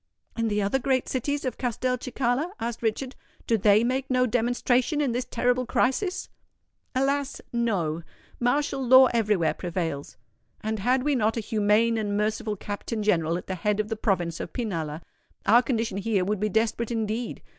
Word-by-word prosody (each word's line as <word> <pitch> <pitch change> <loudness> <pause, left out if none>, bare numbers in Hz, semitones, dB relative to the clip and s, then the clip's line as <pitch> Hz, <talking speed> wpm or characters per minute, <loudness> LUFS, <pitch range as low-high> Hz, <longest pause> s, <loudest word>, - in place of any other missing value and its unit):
"And 230 -1 0
the 210 -1 0
other 205 +7 +1
great 260 -1 0
cities 285 +3 -2
of 255 - -3
Castelcicala?" 250 - -1
asked 235 0 -4
Richard: 235 +4 -2 0.3
"do 230 - +2
they 210 +1 +4
make 260 +2 -1
no 255 -1 +3
demonstration 245 +4 +1
in 285 -4 +1
this 245 +2 -2
terrible 245 +1 +1
crisis?" 360 +12 0 0.7
"Alas—no! 235 - -1 0.4
Martial 270 +2 +1
law 260 0 +7
everywhere 210 -8 +2
prevails; 165 - -4 0.4
and 220 0 -2
had 250 +5 +2
we 295 +1 +2
not 225 -3 +1
a - - +1
humane 220 +1 +2
and 205 -1 -1
merciful 215 0 -1
Captain 210 +2 -4
General 170 -5 +2
at - - -7
the 190 - -4
head 205 +3 0
of 215 0 -1
the 225 - -1
province 175 -6 -1
of - - -6
Pinalla, 165 - -3 0.4
our 235 +3 +6
condition 230 -4 -1
here 200 -3 0
would 210 +1 -1
be 215 +1 0
desperate 225 +2 0
indeed. 225 0 -3
230 Hz, 165 wpm, -26 LUFS, 210-250 Hz, 0.7 s, law